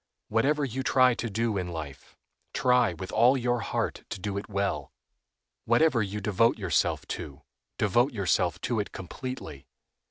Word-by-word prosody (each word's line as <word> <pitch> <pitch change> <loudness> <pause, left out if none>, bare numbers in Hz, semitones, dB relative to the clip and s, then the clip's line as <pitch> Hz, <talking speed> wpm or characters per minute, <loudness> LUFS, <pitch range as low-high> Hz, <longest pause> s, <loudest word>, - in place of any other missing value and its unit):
Whatever 140 +7 +2
you 130 0 -3
try 130 -1 +4
to 120 0 -4
do 110 0 0
in 90 - -3
life, 80 -5 -8 0.4
try 125 -3 +3
with 95 +3 -7
all 125 +3 +5
your 120 -1 0
heart 115 - -2
to - - -5
do 100 +1 -3
it 100 - -5
well; 100 -1 -2 0.7
whatever 120 +1 +3
you 100 0 -3
devote 105 +3 +2
yourself 95 -7 0
to, 70 0 -6 0.3
devote 120 +7 +2
yourself 90 - +1
to 120 -3 -1
it 105 - -3
completely. 90 - -7
110 Hz, 155 wpm, -28 LUFS, 95-125 Hz, 0.7 s, all